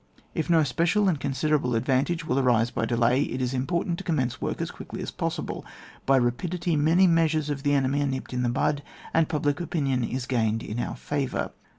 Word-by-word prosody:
If 160 - -2
no 165 -2 +5
special 170 - +2
and 165 -6 +1
considerable 140 -1 0
advantage 135 +8 +1
will 135 -2 +1
arise 120 -3 +3
by - - -1
delay, 120 +2 +2
it 130 -2 -2
is 125 0 -1
impor 150 +7 0
tant 175 -1 -2
to - - -6
commence 135 -9 -1
work - - -2
as - - -3
quickly - - -8
as - - -5
possible. - - -3 0.4
By 135 0 +5
rapidity, 165 +8 0
many 160 +5 +4
measures 160 -3 +2
of 140 -1 -3
the 145 0 +2
enemy 140 +1 +1
are 145 - +1
nipped 130 -1 -4
in 125 - -1
the 120 - +1
bud, 145 +3 0 0.3
and 165 -1 +3
public 145 0 0
opinion 140 -7 0
is 125 +2 -3
gained 115 -3 0
in 110 +3 -4
our - - -3
favour. 145 -3 -2
140 Hz, 210 wpm, -26 LUFS, 125-160 Hz, 0.4 s, no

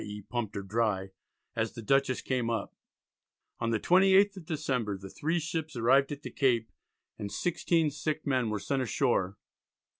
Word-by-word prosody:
e. 105 0 -6
pumped 110 +1 -4
her 100 - -3
dry) 100 -2 0 0.4
as 110 0 -1
the 115 - -7
Dutchess 135 +2 +2
came 125 -3 0
up." 115 - -3 0.8
On 115 - 0
the 115 -2 +1
28th 195 - +5
of 185 -4 -10
December 130 - -1
the 95 0 -10
three 165 +3 -1
ships 160 -2 -3
arrived 135 +4 +4
at 145 0 -6
the - - -6
Cape, 120 -5 +1 0.5
and 100 -1 -4
16 165 -3 +1
sick 155 +1 -3
men 130 -5 +1
were 110 - -1
sent 135 +6 -1
ashore. 105 -5 0
125 Hz, 170 wpm, -30 LUFS, 110-155 Hz, 0.8 s, 28th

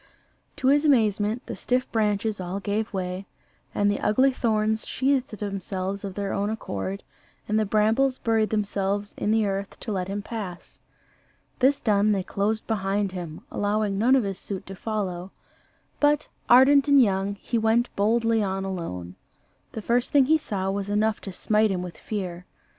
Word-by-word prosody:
To 265 -3 +1
his 290 +2 +4
amazement 220 -4 +2
the - - -5
stiff 250 +1 0
branches 210 -1 0
all 180 +2 -4
gave 210 +2 -2
way, 185 0 -4 0.5
and 205 0 +3
the 205 - -2
ugly 260 +6 +3
thorns 220 -2 0
sheathed 265 -4 0
themselves 195 -1 -3
of 195 -2 -5
their 200 -1 -2
own 200 +1 0
accord, 100 - -4 0.4
and 215 +1 +1
the 215 - 0
brambles 225 +6 +2
buried 225 -3 +1
themselves 205 -1 -1
in - - -2
the 220 0 +3
earth 195 0 -3
to 220 - -4
let 185 -3 -2
him 200 +1 -4
pass. 205 -6 -7 0.8
This 270 +2 +3
done, 210 -1 +3
they 195 -2 -1
closed 210 +4 -1
behind 200 -2 -1
him, 175 -4 -7
allowing 205 -1 0
none 250 +5 +5
of 260 - +3
his 195 -2 -4
suite 195 -2 -5
to 195 - -8
follow: 190 -4 -3 0.7
but, 295 0 +3 0.2
ardent 270 +3 +7
and 280 -1 +6
young, 200 -3 +2
he 230 +3 -2
went 225 +2 +1
boldly 225 +2 +2
on 195 -1 -2
alone. 90 - -5 0.6
The 220 - -6
first 240 +3 +1
thing 280 -2 +5
he 315 +3 +4
saw 195 -8 -2
was 200 0 -3
enough 215 +1 +1
to 195 - -6
smite 215 +3 +2
him 180 -2 -2
with 180 -2 -8
fear. 180 -4 -5
210 Hz, 170 wpm, -25 LUFS, 195-225 Hz, 0.8 s, ardent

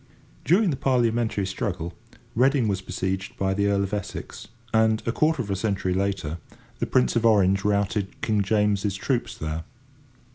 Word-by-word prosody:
During 185 +3 +3
the 135 - -2
Parliamentary 120 -6 +1
struggle, 95 -4 -3 0.4
Reading 130 0 +3
was 95 -2 -1
besieged 95 +1 -3
by 95 0 +1
the 100 +1 +1
Earl 100 -1 +2
of 100 +1 -4
Essex, 105 -2 -5 0.3
and, 110 0 +3
a 115 - +1
quarter 155 +1 +1
of 100 - -6
a - - +1
century 95 -2 -1
later, 95 -4 -2 0.4
the - - -1
Prince 65 -1 +2
of 115 - +2
Orange 100 -3 +4
routed 100 -1 0
King 105 -2 +1
James's 105 -1 +1
troops 120 +1 -2
there. 80 +1 -4
100 Hz, 160 wpm, -25 LUFS, 95-115 Hz, 0.4 s, Orange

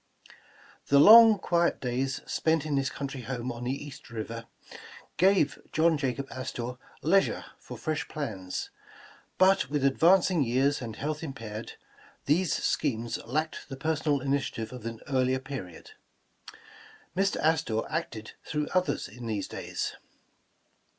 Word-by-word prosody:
'^ - - -17 0.5
THE 140 - +4
long, 220 +7 +9
quiet 170 -2 +1
days 130 +2 -2
spent 160 -2 +1
in 150 -2 -1
his 135 -1 +1
country 135 -1 -5
home 125 0 -4
on 120 +1 -6
the 135 +3 -3
East 145 - -11
River, 115 0 -6 0.7
gave 180 -7 +3
John 160 +1 +3
Jacob 135 -1 -2
Astor 125 -1 -5 0.2
leisure 190 +5 +2
for - - -9
fresh 155 -1 -2
plans, 95 -11 -5 0.7
but 190 -6 +4
with 145 -1 0
advancing 170 +3 +4
years 135 +4 +1
and 115 -3 -6
health 150 +4 -3
impaired, 115 -8 -6 0.5
these 160 +3 +2
schemes 120 -5 -1
lacked 155 +6 -2
the 135 - -6
personal 150 -1 0
ini 140 +1 +1
tiative 115 -5 -5
of 125 -3 -7
an 115 -1 -7
earlier 130 -1 +2
period. 130 - -8 1.2
Mr. 195 +1 +1
Astor 155 -8 +2
acted 110 0 -4
through 150 -1 -2
others 185 0 0
in 120 +3 -9
these 105 -3 -2
days. - - -4
140 Hz, 135 wpm, -28 LUFS, 120-160 Hz, 1.2 s, long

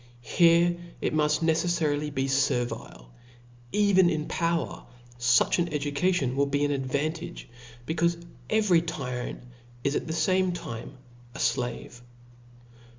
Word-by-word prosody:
Here 170 +5 +4 0.2
it - - -1
muft 150 0 +2
ne 160 0 +4
cefTarily 155 -3 0
be 135 -1 -1
fertile 120 - -1 0.4
\ 120 0 -26 0.2
even 190 -3 +5
in 155 -3 -1
power 170 -1 -2 0.3
fuch 120 +7 +3
an 175 - +1
educa 150 +4 0
tion 135 -8 0
will 140 +1 +2
be 140 +1 +1
an 145 - 0
advantage^ 145 +4 -3 0.4
becaufe 170 +1 +1 0.3
every 205 -6 +3
tyrant 125 -9 -5 0.4
is 140 +1 0
at - - -2
the 160 - -2
fame 185 +2 +2
time 120 -4 -7 0.4
a - - -7
flave. 120 -1 -2
150 Hz, 135 wpm, -27 LUFS, 135-170 Hz, 0.4 s, even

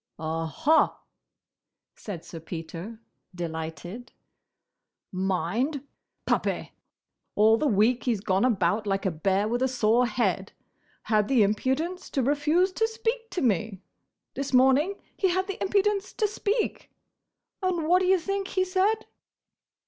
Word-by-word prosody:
"Aha!" 165 - +1 1.0
said 185 -6 -8
Sir 165 - -8
Peter, 170 +6 -7 0.4
delighted. 170 +6 -6 1.0
"Mind! 195 - -1 0.4
Puppy! - - -1 0.6
All 215 +2 +5
the 295 +6 0
week 230 +2 +2
he's 235 -5 +1
gone 190 0 +1
about 210 -2 +1
like 195 0 -1
a 190 - +2
bear 190 +6 0
with 240 +3 -1
a 260 - +3
sore 245 -1 +2
head! 205 -4 -1 0.5
Had 210 -2 +2
the 255 -5 +4
impudence 265 - -1
to 270 - 0
refuse 300 +7 +2
to 445 +4 +1
speak 455 +1 -3
to 360 - -3
me! 210 -3 0 0.5
This 275 0 -4
morning 265 +9 +4 0.2
he 380 - +1
had 375 +1 +1
the 395 -1 -6
impudence 400 0 +1
to 430 - +1
speak! 420 +2 -2 0.7
And 355 -4 0
what 360 +2 +4
d' - - +1
ye 380 0 +5
think 395 +2 -3
he 370 -1 0
said?" 395 +4 +1
250 Hz, 135 wpm, -27 LUFS, -, 1.0 s, All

